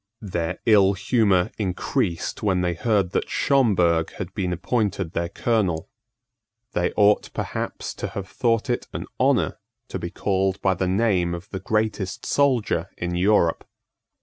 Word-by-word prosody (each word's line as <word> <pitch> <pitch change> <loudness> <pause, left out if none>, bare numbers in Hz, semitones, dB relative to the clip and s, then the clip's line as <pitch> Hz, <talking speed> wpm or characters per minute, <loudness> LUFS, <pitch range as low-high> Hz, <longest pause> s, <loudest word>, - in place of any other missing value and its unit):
Their 90 -5 -2
ill 100 -3 +5
humour 100 -3 +2
increased 90 -3 -1
when 95 -4 +1
they 90 -1 0
heard 100 0 +1
that - - -1
Schomberg 90 - +2
had 95 -2 -6
been 95 -3 -2
appointed 95 -1 -1
their 85 0 -1
colonel. 100 -6 0 0.8
They 90 - 0
ought 105 0 +3
perhaps - - -4
to - - -1
have 100 -1 -6
thought 115 +3 0
it 120 -1 -1
an - - -4
honour - - +2 0.3
to - - -4
be - - -4
called 95 -1 0
by 95 - +2
the 95 0 -1
name 95 -3 +1
of 85 +3 -10
the 95 - -4
greatest 105 -1 -1
soldier 130 -7 +1
in 85 0 -3
Europe. 90 -2 +2
95 Hz, 150 wpm, -24 LUFS, 90-110 Hz, 0.8 s, ill